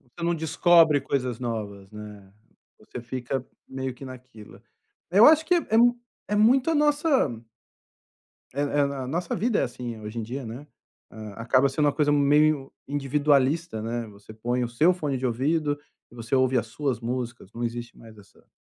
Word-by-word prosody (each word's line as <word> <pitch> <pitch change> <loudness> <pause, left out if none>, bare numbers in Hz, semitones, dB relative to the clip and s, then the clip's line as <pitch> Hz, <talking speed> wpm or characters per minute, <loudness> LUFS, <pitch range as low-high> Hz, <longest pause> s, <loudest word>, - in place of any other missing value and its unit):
Você 130 +7 -9
não 170 0 +1
descobre 160 -1 +4
coisas 125 -3 -2
novas, 105 -5 -5
né, 105 -2 -11 0.5
você 110 +3 -9
fica 125 +1 -4 0.2
meio 130 -1 -4
que 135 - -11
naquilo. 130 -4 -12 0.5
É, 190 - +2
eu 220 - +9
acho 315 +1 +6
que 360 - +3
é - - +4
é - - +1
m 240 +1 +5 0.3
é 210 - -1
muito 250 +8 +4
a - - +1
nossa 295 -1 +2 1.3
Eh 140 - -2
eh, 145 0 0
a 130 -2 -5
nossa 170 +5 -2
vida 225 +3 0
é - - +2
assim, 120 -2 -6
hoje 110 +2 -7
em - - -2
dia, 125 +5 -6
né. 125 +6 -8 0.4
Ah, 110 -1 -9
acaba 130 +4 +3
sendo 150 +3 -1
uma 145 - +3
coisa 150 0 +1
meio 145 0 +3 0.2
individualista, 145 0 +1
né, 115 +1 -3
você 100 +1 -14
põe 120 +3 -1
o 120 - -3
seu 155 +10 +3
fone 150 -6 -3
de 130 - -5
ouvido, 145 +5 0 0.3
você 115 +1 -5
ouve 130 -1 +3
as 115 - -2
suas 130 0 -3
músicas. 120 -3 -5
Não 120 +1 -4
existe 120 0 -5
mais 110 -1 -15
essa 100 -1 -20
130 Hz, 185 wpm, -25 LUFS, 115-155 Hz, 1.3 s, eu